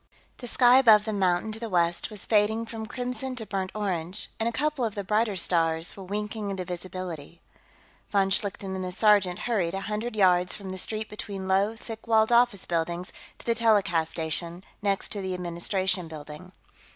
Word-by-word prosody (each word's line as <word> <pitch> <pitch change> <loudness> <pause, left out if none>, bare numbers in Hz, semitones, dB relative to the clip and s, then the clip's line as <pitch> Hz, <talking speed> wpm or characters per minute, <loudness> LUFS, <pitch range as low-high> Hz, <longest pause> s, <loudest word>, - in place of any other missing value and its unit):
The 245 - -6
sky 245 +2 +6
above 215 -5 +6
the 220 - -2
mountain 190 +1 +1
to 220 - -4
the 230 -1 -5
west 175 -2 +1
was 210 -3 -5
fading 220 +1 +2
from 220 -1 -6
crimson 250 +2 -4
to 225 -3 -4
burnt 190 -2 -3
orange, 185 -2 -2
and 225 +1 +1
a - - -4
couple 295 +1 -1
of 220 -3 -1
the 200 - -3
brighter 210 +1 +1
stars 165 -2 +1
were 195 - -9
winking 210 +2 -4
into 190 -2 -3
visibility. 175 -3 -6 0.7
Von 195 -1 +2
Schlichten 195 0 0
and 190 - -3
the 180 - -4
sergeant 195 -2 +4
hurried 195 -8 0
a 195 - -3
hundred 215 +3 -3
yards 180 -3 +3
down 195 -2 -8
the 185 0 -4
street 215 +3 -1
between 200 -2 -6
low, 195 +3 +2
thick 225 0 -9
walled 220 0 +4
office 235 -5 +4
buildings 170 +1 -2 0.2
to - - -14
the 235 - +2
telecast 200 -8 +2
station, 170 +2 -3 0.2
next 200 -1 0
to 205 - -1
the 190 -1 -3
Administration 180 +1 -1
Building. 155 +3 -10
195 Hz, 190 wpm, -27 LUFS, 180-220 Hz, 0.7 s, sky